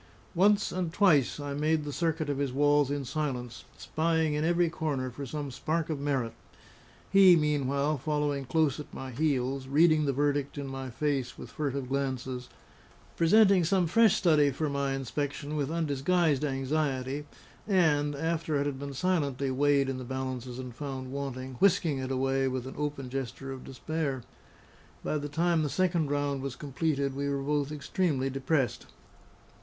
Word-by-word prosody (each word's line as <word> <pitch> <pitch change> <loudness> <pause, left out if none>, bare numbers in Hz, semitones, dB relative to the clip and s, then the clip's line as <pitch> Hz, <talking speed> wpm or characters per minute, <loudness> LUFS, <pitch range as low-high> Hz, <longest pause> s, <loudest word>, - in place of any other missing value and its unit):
Once 200 +3 +3
and 180 -2 -2
twice 160 - +3
I 145 -1 -4
made 155 +2 +1
the 145 -1 -5
circuit 160 -1 -1
of 140 -1 -2
his 140 -2 0
walls 145 +1 +3
in 145 -1 -2
silence, 125 -4 -4
spying 160 -1 0
in 150 +1 0
every 175 +1 +3
corner 145 -6 -2
for 140 +3 -7
some 145 +1 -4
spark 155 +5 -2
of 150 - -2
merit; 135 -5 -1 0.8
he, 195 -2 +8
meanwhile, 145 -1 +1
following 145 -1 -1
close 145 +1 +1
at 150 - -8
my 130 0 -6
heels, 135 -1 -1
reading 155 +2 +4
the 140 - +2
verdict 145 +1 0
in 140 - -3
my 135 -1 -5
face 135 0 -2
with - - -9
furtive 140 -3 -3
glances, 130 -2 -3 0.7
presenting 195 +2 +5
some 180 +2 +2
fresh 225 +5 +4
study 155 -5 +4
for 150 +3 -2
my 140 -1 -1
inspection 145 +2 -3
with 145 -2 -1
undisguised 160 -1 +1
anxiety, 135 0 -1 0.4
and 150 -7 +2
(after 160 +1 -1
it 140 - 0
had 140 -2 -3
been 140 -1 -6
silently 140 -6 0
weighed 140 +1 +3
in 135 -1 -3
the - - -6
balances 130 -1 -4
and 125 -2 -7
found 130 -1 -6
wanting) 130 -2 -5
whisking 170 -7 +3
it 130 0 -4
away 135 0 +1
with 130 -1 -3
an 130 - -7
open 145 -2 -3
gesture 135 +1 -5
of 130 -1 -7
despair. 140 -1 -3 0.8
By 150 - -1
the 145 0 -5
time 165 +2 +1
the 150 - 0
second 170 -3 +1
round 145 -1 -1
was 135 -2 -4
completed, 140 -1 -1
we 140 +1 -2
were 140 -1 -1
both 145 0 0
extremely 145 -2 -1
depressed. 135 0 -1
145 Hz, 165 wpm, -29 LUFS, 135-155 Hz, 0.8 s, he